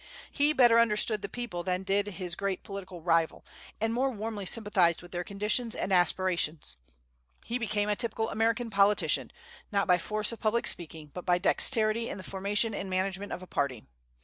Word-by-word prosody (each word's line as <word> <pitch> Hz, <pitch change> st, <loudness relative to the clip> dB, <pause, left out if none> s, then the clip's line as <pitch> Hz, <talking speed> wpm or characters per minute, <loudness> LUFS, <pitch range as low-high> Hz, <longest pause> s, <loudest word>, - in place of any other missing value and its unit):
He 290 Hz, +1 st, +3 dB
better 240 Hz, -5 st, +5 dB
understood 215 Hz, -1 st, +2 dB
the 200 Hz, -, -5 dB
people 240 Hz, -8 st, -5 dB
than 185 Hz, +1 st, -2 dB
did 200 Hz, +1 st, +1 dB
his 185 Hz, -3 st, -5 dB
great 195 Hz, 0 st, -3 dB
political 190 Hz, -4 st, -8 dB
rival, 165 Hz, -1 st, +1 dB, 0.3 s
and 225 Hz, +1 st, 0 dB
more 260 Hz, +3 st, +1 dB
warmly 215 Hz, -4 st, -4 dB
sympathized 185 Hz, -7 st, +2 dB
with 175 Hz, -, -13 dB
their 175 Hz, 0 st, -3 dB
conditions 210 Hz, +5 st, 0 dB
and 195 Hz, -, -2 dB
aspirations. 175 Hz, -, +1 dB, 0.7 s
He 240 Hz, +2 st, -2 dB
became 210 Hz, -2 st, -1 dB
a 210 Hz, -, +1 dB
typical 225 Hz, 0 st, -2 dB
American 230 Hz, +2 st, 0 dB
politician, 200 Hz, +1 st, +2 dB, 0.4 s
not 200 Hz, -1 st, +1 dB
by 180 Hz, -1 st, +4 dB
force 215 Hz, +5 st, -1 dB
of 230 Hz, -, -7 dB
public 225 Hz, +1 st, +1 dB
speaking, 160 Hz, -3 st, 0 dB
but 180 Hz, -, -7 dB
by 175 Hz, -1 st, +4 dB
dexterity 220 Hz, +4 st, +2 dB
in -, -, -5 dB
the 190 Hz, -, -8 dB
formation 205 Hz, +4 st, -1 dB
and 195 Hz, -1 st, -4 dB
management 190 Hz, +2 st, -2 dB
of 180 Hz, -, -5 dB
a -, -, -8 dB
party. 140 Hz, -9 st, -2 dB
200 Hz, 180 wpm, -29 LUFS, 180-225 Hz, 0.7 s, better